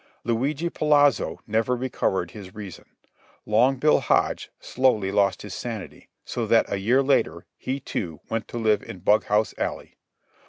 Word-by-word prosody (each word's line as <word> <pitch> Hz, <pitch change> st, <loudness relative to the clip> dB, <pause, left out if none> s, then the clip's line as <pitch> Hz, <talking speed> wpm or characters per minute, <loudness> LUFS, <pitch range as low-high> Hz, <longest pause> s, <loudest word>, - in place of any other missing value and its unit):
Luigi 135 Hz, +8 st, -1 dB
Polazzo 145 Hz, -3 st, +2 dB
never 115 Hz, +3 st, +1 dB
recovered 120 Hz, -8 st, -1 dB
his 95 Hz, -4 st, -11 dB
reason. 100 Hz, -4 st, -9 dB, 0.6 s
Long 120 Hz, +5 st, +3 dB
Bill 150 Hz, +4 st, +4 dB
Hodge -, -, +1 dB
slowly 115 Hz, -7 st, +1 dB
lost 100 Hz, -1 st, +1 dB
his 105 Hz, -3 st, -7 dB
sanity, 110 Hz, -6 st, -7 dB, 0.2 s
so -, -, -3 dB
that -, -, +4 dB
a 100 Hz, -, -1 dB
year 125 Hz, +7 st, +3 dB
later, 135 Hz, 0 st, +1 dB
he, 135 Hz, +2 st, -4 dB
too, 85 Hz, -, -5 dB
went 115 Hz, -1 st, -3 dB
to -, -, -6 dB
live 110 Hz, -2 st, +2 dB
in 90 Hz, -, -10 dB
Bughouse 105 Hz, +2 st, +2 dB
Alley. -, -, -4 dB
115 Hz, 150 wpm, -25 LUFS, 100-130 Hz, 0.6 s, Bill